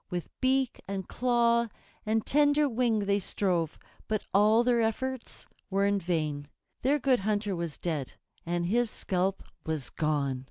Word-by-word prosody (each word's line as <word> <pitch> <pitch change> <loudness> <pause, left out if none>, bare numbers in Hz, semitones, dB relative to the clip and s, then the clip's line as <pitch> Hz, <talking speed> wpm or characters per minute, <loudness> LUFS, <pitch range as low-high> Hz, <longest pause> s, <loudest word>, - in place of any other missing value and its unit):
With 175 -3 -4
beak 260 -1 +1
and 195 -1 -4
claw 235 -1 +2 0.4
and 220 0 +1
tender 290 +1 +4
wing 230 -4 +1
they 200 0 +2
strove, 180 -5 -1 0.3
but 215 -1 -1
all 215 +4 +5
their 240 -1 +3
efforts 260 +3 -3 0.2
were 195 0 +2
in 200 0 +2
vain. 155 -5 -2 0.3
Their 275 +4 +3
Good 265 -3 +2
Hunter 205 0 0
was 170 -4 -4
dead, 155 -7 -3 0.3
and 175 0 -1
his 235 +5 +2
scalp 190 -1 -1 0.2
was 155 -4 -3
gone. 145 -4 0
205 Hz, 150 wpm, -29 LUFS, 175-240 Hz, 0.4 s, all